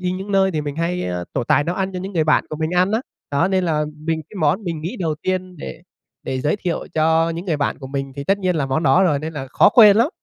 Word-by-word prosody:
đi 180 -1 -1
những 190 +2 -5
nơi 190 0 +3
thì 155 -4 -2
mình 145 -1 -5
hay 170 +2 -1 0.3
trổ - - -1
tài 145 - +3
nấu 175 +3 -2
ăn 190 0 -2
cho 185 - -4
những 190 +2 -6
người 160 -3 +1
bạn 155 - +3
của 155 - -5
mình 160 +1 -2
ăn 180 +3 +2
á. 220 - +1 0.3
Đó 155 +6 +2
nên 190 -1 +1
là 155 -3 0
mình 160 +1 -2
cái - - -14
món 155 +8 +1
mình 165 -3 -3
nghĩ 180 +10 -4
đầu 165 -7 -1
tiên 185 -1 -2
để 155 +1 -8 0.4
để 130 - -3
giới 150 +8 0
thiệu 180 -4 -3
cho 160 +1 +2
những 165 +2 -5
người 165 -4 0
bạn 145 - -1
của 135 - -8
mình 135 0 -4
thì 140 - -5
tất 195 +4 +2
nhiên 185 -3 0
là 145 -3 0
món 135 +4 -1
đó 145 +5 +4
rồi 160 -7 +2
nên 155 +3 -5
là 140 -4 -5
khó - - +5
quên 210 -2 +7
lắm. 235 +5 +4
165 Hz, 295 wpm, -20 LUFS, 150-185 Hz, 0.4 s, quên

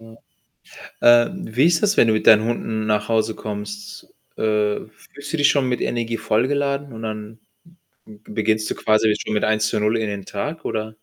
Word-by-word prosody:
Ja. 115 0 -15 0.9
Ähm, 120 +2 +3
wie 135 - +4
ist 170 -1 +3
das, 210 0 +2
wenn 115 - +5
du - - +3
mit 110 - -1
deinen 110 -1 +7
Hunden 110 -1 -2
nach 105 -1 0
Hause 110 -1 +1
kommst? 105 -1 -7 0.3
Äh, 105 -1 0
fühlst 140 +6 -12
du 165 - -1
dich 145 - +4
schon 135 -3 +1
mit 125 - -1
Energie 115 -1 -2
vollgeladen 140 +5 -1
und 110 0 -9
dann 110 0 -6 0.7
b 105 - -15
beginnst 110 0 0
du - - -1
quasi 110 0 +2
schon - - -4
mit 105 - +1
1 110 0 +1
zu 110 - -1
0 105 +2 +1
in 110 -2 -2
den 100 -2 -5
Tag 150 +12 -5
oder? 110 0 -4
110 Hz, 195 wpm, -21 LUFS, 105-120 Hz, 0.9 s, deinen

